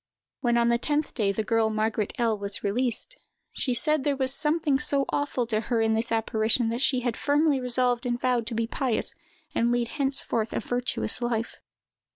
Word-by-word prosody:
When 240 -2 +1
on 235 0 +3
the 235 0 +2
tenth 295 +3 -1
day 210 -5 +1
the 215 +2 -2
girl 225 0 +2
Margaret 215 -1 -1
L—— 230 -2 +1
was 200 0 -1
released, 230 +3 0 0.4
she 250 -3 -1
said 305 +5 +3
that - - -6
there 285 -1 +2
was 260 -1 0
something 300 -2 +2
so 285 -2 +2
awful 285 -4 -1
to 220 -2 0
her 230 +1 -1
in 225 0 +2
this 225 +1 0
apparition, 225 +1 +1
that 235 +2 -2
she 260 -1 +2
had 240 -2 -1
firmly 290 -1 +2
resolved 250 -1 0
and 240 0 -1
vowed 245 -2 0
to 235 - -3
be 230 0 0
pious 245 0 -1 0.4
and 235 +1 +1
lead 240 -1 0
henceforth 270 -6 -1
a - - 0
virtuous 245 - -1
life. 235 -1 -2
240 Hz, 200 wpm, -26 LUFS, 225-265 Hz, 0.4 s, on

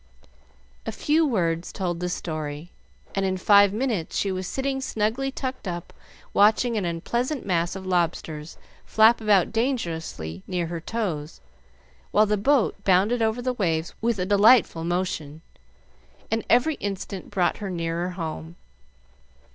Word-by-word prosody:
A - - -1
few 310 +2 +2
words 170 - 0
told 175 -3 -3
the 180 0 -2
story, 155 -1 -5 0.4
and 195 - 0
in 190 -1 0
five 200 +1 +6
minutes 215 -6 -2
she 200 - 0
was 185 -1 -3
sitting 270 +3 -2
snugly 230 +3 -1
tucked 260 -5 -5
up 175 -1 -5 0.4
watching 220 +3 +4
an 205 -4 -1
unpleasant 235 - -2
mass 175 -2 0
of 190 -1 -7
lobsters 165 -3 -2 0.3
flap 220 +2 +4
about 205 -4 +3
dangerously 165 - -2
near 175 -2 -1
her 165 0 -5
toes, 170 -8 -4 0.7
while 215 - +4
the 210 0 +1
boat 210 -2 +1
bounded 200 +6 +3
over 225 +2 0
the 255 0 0
waves 165 -7 -1
with 230 -1 +1
a 180 - -1
delightful 205 -3 +5
motion, 165 -3 -2 0.9
and 225 0 0
every 260 +6 +3
instant 195 -1 -5
brought 185 -4 +1
her 200 - -5
nearer 170 0 -2
home. 165 -2 -6
190 Hz, 140 wpm, -25 LUFS, 170-225 Hz, 0.9 s, five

